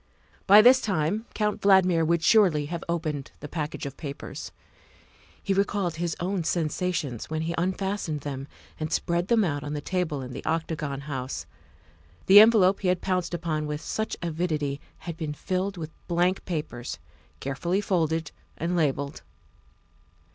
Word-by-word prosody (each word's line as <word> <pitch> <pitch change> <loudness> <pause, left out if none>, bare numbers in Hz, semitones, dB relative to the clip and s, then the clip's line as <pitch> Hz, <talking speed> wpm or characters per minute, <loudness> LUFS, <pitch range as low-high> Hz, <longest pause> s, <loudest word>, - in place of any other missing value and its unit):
By 205 +2 +9
this 255 +2 +7
time 195 +3 -1
Count 210 -1 0
Valdmir 185 -4 +5
would 165 0 +1
surely 185 -10 +5
have 170 +2 -5
opened 155 -5 -2
the 145 - -7
package 150 -1 -4
of 140 -1 -6
papers. 140 - -7 0.9
He 195 - +1
recalled 195 -3 0
his 170 -1 -1
own 180 0 -1
sensations 160 -6 -1
when 155 0 -2
he 165 +1 -2
unfastened 185 -3 -2
them 135 -1 -5 0.3
and 155 0 -3
spread 175 +1 0
them 230 -1 +4
out 145 -5 -1
on 145 0 -4
the 150 - -2
table 160 -4 -2
in 125 0 -7
the 135 - -7
Octagon 155 -3 -2
House. 135 -3 -4 0.8
The 195 +2 +10
envelope 210 -3 +6
he 190 - -2
had 180 0 +2
pounced 180 -2 -1
upon 155 -3 -2
with 150 0 -3
such 220 +5 -3
avidity 155 -4 -1 0.2
had 170 -2 -5
been 155 -3 -4
filled 185 +3 -2
with 160 -2 -6 0.2
blank 175 +2 +1
papers 150 -9 -4 0.4
carefully 170 +8 -1
folded 165 -5 0 0.3
and 170 +2 -1
labelled. 140 -3 0
170 Hz, 155 wpm, -26 LUFS, 150-185 Hz, 0.9 s, The